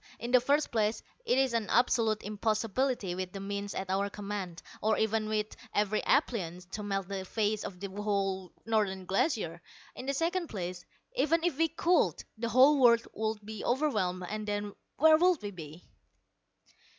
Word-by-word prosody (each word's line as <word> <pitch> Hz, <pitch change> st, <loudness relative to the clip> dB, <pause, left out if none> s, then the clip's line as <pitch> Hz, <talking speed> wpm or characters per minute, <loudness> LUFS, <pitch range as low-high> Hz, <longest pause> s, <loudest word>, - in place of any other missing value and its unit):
In 240 Hz, -, -5 dB
the 250 Hz, -1 st, +6 dB
first 285 Hz, +4 st, +2 dB
place 220 Hz, -1 st, 0 dB, 0.2 s
it -, -, +3 dB
is 265 Hz, -2 st, +2 dB
an 225 Hz, -3 st, -1 dB
absolute 230 Hz, -3 st, +2 dB
impossibility 215 Hz, 0 st, -1 dB
with 180 Hz, 0 st, -4 dB
the 195 Hz, -, -5 dB
means 200 Hz, 0 st, -4 dB
at 190 Hz, 0 st, -3 dB
our 200 Hz, +1 st, +1 dB
command, 200 Hz, -4 st, -5 dB, 0.2 s
or 220 Hz, +1 st, +2 dB
even 220 Hz, 0 st, 0 dB
with 215 Hz, 0 st, -1 dB, 0.2 s
every 210 Hz, +1 st, +2 dB
appliance, 185 Hz, -, +1 dB
to 210 Hz, -, -4 dB
melt 195 Hz, -2 st, -2 dB
the 195 Hz, -1 st, -4 dB
face 215 Hz, +2 st, -1 dB
of 180 Hz, -2 st, -7 dB
the 200 Hz, -, -4 dB
whole 195 Hz, -2 st, -2 dB
Northern 205 Hz, -4 st, 0 dB
Glacier. 185 Hz, -, 0 dB, 0.3 s
In 255 Hz, -, -7 dB
the 275 Hz, -, 0 dB
second 340 Hz, +3 st, 0 dB
place, 180 Hz, -5 st, -5 dB, 0.3 s
even 330 Hz, -, +2 dB
if 345 Hz, -5 st, +1 dB
we 325 Hz, -, +4 dB
could, 335 Hz, +2 st, +1 dB
the 230 Hz, +1 st, -3 dB
whole 265 Hz, +5 st, +6 dB
world 235 Hz, -2 st, +5 dB
would 220 Hz, -1 st, -3 dB
be 215 Hz, -1 st, -6 dB
overwhelmed, 210 Hz, -10 st, 0 dB
and 215 Hz, +1 st, -4 dB
then 205 Hz, 0 st, -2 dB, 0.2 s
where 315 Hz, +1 st, +7 dB
would 360 Hz, -2 st, +4 dB
we 205 Hz, -, -4 dB
be?" 160 Hz, -2 st, -10 dB
215 Hz, 175 wpm, -31 LUFS, 195-250 Hz, 0.3 s, where